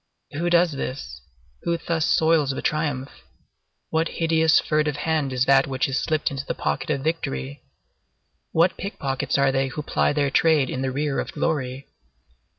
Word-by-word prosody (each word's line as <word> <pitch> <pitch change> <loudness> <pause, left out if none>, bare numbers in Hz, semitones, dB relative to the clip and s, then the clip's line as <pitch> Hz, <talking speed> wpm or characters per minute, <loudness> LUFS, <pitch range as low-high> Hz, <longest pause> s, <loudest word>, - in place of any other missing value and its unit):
Who 170 +4 -1
does 175 0 +4
this? 135 - -5 0.4
Who 170 0 0
thus 165 -1 -1
soils 160 -3 +3
the 135 - -3
triumph? 145 -3 -1 0.8
What 160 +1 +1
hideous, 160 -1 +4
furtive 150 -1 0
hand 150 -2 -1
is 130 0 +1
that 135 0 +4
which 130 -1 0
is 135 0 -1
slipped 155 -3 0
into 135 -1 -4
the - - -4
pocket - - -2
of 140 -3 -1
victory? 70 - -3 0.9
What 170 +3 +3
pickpockets 140 -11 -2
are 140 -1 +3
they 135 0 +1
who 150 +3 -5
ply - - +1
their 145 -2 0
trade 155 -3 +3
in 130 - -3
the 135 - 0
rear 145 +1 -1
of - - -4
glory? 140 -4 -2
145 Hz, 165 wpm, -24 LUFS, 135-160 Hz, 0.9 s, does